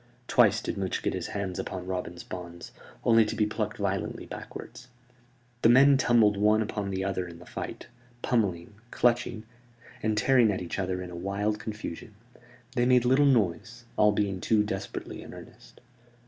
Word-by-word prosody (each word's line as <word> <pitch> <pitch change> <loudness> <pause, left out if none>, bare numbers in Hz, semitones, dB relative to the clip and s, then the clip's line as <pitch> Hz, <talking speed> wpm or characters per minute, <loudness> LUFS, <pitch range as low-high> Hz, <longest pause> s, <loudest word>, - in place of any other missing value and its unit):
Twice 110 -3 +4
did - - -3
Much 95 -1 -2
get - - 0
his - - -3
hands 95 -3 -4
upon 90 -1 -5
Robin's 90 -2 -4
bonds, 85 -2 -8 0.3
only 115 -1 +5
to 105 - -3
be 105 - +2
plucked 105 - -3
violently - - -2
backward. - - -9 0.8
The 115 - +5
men 135 +3 +7
tumbled 115 -6 +4
one 105 +2 +3
upon 105 -2 -4
the 95 0 -2
other 95 -2 -2
in 85 -1 -10
the 90 - -14
fight, - - -6 0.4
pummelling, 100 -6 0 0.2
clutching, 120 -2 +1 0.6
and 110 -2 0
tearing 125 -2 +4
at 95 - -2
each 90 +2 -5
other 90 -1 -2
in 90 - -8
a - - -7
wild 100 +4 -2
confusion. 110 -2 -7 0.6
They 120 -1 +2
made 125 -1 +4
little 135 +3 +4
noise, 115 -1 0
all 105 0 +5
being 100 -3 -1
too 110 -2 +3
desperately 100 -1 -5
in - - -10
earnest. - - -14
105 Hz, 170 wpm, -28 LUFS, 95-115 Hz, 0.8 s, men